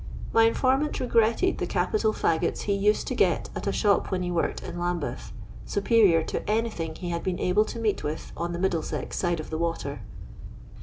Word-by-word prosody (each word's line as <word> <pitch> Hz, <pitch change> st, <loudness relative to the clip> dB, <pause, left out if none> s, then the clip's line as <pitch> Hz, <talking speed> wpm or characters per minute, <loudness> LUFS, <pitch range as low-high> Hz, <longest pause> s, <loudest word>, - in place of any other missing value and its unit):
My 225 Hz, -, +6 dB
informant 265 Hz, +5 st, +1 dB
re -, -, -1 dB
gretted 235 Hz, +10 st, +2 dB
the -, -, -1 dB
capital 425 Hz, -, +1 dB
fttgots 165 Hz, -6 st, 0 dB
he 205 Hz, -, 0 dB
used 205 Hz, +2 st, +2 dB
to -, -, -2 dB
get -, -, +1 dB
at -, -, -4 dB
a -, -, +2 dB
shop 205 Hz, -2 st, +2 dB
when 185 Hz, -1 st, -1 dB
he 180 Hz, -, -2 dB
worked 170 Hz, -1 st, -1 dB
in 175 Hz, -, -6 dB
Lambeth; 175 Hz, -8 st, -3 dB, 0.4 s
superior 200 Hz, -5 st, +4 dB
to -, -, -4 dB
anything 210 Hz, -8 st, -1 dB
he 175 Hz, +1 st, -5 dB
had 170 Hz, 0 st, -2 dB
been 185 Hz, -2 st, -2 dB
able 195 Hz, +4 st, +3 dB
to -, -, -7 dB
meet 220 Hz, -3 st, 0 dB
with 150 Hz, +2 st, -4 dB
on 170 Hz, +1 st, -3 dB
the 170 Hz, -, -3 dB
Middlesex 175 Hz, -3 st, -2 dB
side 175 Hz, -2 st, 0 dB
of 155 Hz, -, -7 dB
the 160 Hz, -, -2 dB
water. 165 Hz, -4 st, -3 dB
185 Hz, 200 wpm, -26 LUFS, 170-220 Hz, 0.4 s, My